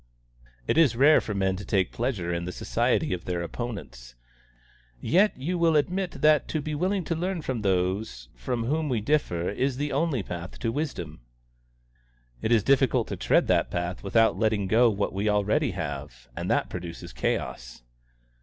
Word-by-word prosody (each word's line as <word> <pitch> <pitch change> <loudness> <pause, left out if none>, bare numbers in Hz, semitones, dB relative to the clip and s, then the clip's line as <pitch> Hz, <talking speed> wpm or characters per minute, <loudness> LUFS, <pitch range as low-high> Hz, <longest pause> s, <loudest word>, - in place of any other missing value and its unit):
"It 160 - +2
is 145 -8 +4
rare 145 +5 +6
for 105 - -5
men 95 -1 +1
to 100 - -7
take 95 -3 0
pleasure 105 -8 -2
in 85 0 -2
the 90 - -4
society 90 - 0
of 90 - -5
their 90 -1 -2
opponents." 85 - -7 0.8
"Yet 195 - +3
you 170 +7 -2
will 165 -1 +3
admit 180 +4 -1
that 150 -1 +5
to 155 - -2
be 155 +1 -4
willing 185 +5 0
to 165 - -2
learn 175 0 -2
from 130 -6 -3
those 95 - -1
from 115 - -3
whom 150 +5 -1
we 120 -4 +1
differ 105 - 0
is 130 +5 -1
the 145 +1 -2
only 140 -5 0
path 85 -1 -7
to 115 - 0
wisdom." 150 - -4 1.2
"It 110 - -1
is 115 -4 +4
difficult 135 -1 +2
to - - -3
tread - - +2
that - - +2
path 85 0 -3
without 110 +3 +3
letting 110 -3 +1
go 115 +5 +4
what 100 -2 -2
we 100 +3 0
already 105 0 +2
have, 65 -3 -6
and - - -4
that - - +1
produces 85 -1 -7
chaos." - - -3
110 Hz, 175 wpm, -26 LUFS, 90-145 Hz, 1.2 s, rare